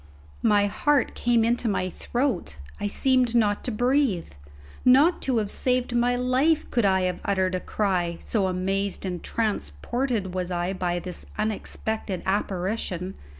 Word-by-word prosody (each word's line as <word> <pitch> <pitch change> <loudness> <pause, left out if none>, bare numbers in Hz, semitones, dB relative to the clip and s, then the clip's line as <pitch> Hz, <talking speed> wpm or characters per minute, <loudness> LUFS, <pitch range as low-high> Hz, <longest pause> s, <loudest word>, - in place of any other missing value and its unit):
My 205 -3 +4
heart 285 +7 +1
came 235 -2 +2
into 240 +1 +1
my 190 -2 0
throat; 240 - -2 0.2
I 205 - -1
seemed 250 +2 +2
not 210 -3 +2
to 250 - -1
breathe; 245 - +1 0.5
not 280 +8 +5
to 260 -3 +1
have 210 -2 0
saved 250 -1 0
my 245 +1 +3
life 260 +6 +2
could 235 -4 +2
I 190 -1 +3
have 185 0 -1
uttered 190 -2 +1
a 185 - 0
cry, 180 -4 -1
so 200 -4 0
amazed 195 +2 -1
and 180 -2 -3
transported 215 - -2
was 185 -1 -2
I 175 +1 -1
by 175 -2 -1
this 180 0 -4
unexpected 215 -2 -3
apparition. 190 -1 -2
205 Hz, 150 wpm, -25 LUFS, 185-245 Hz, 0.5 s, not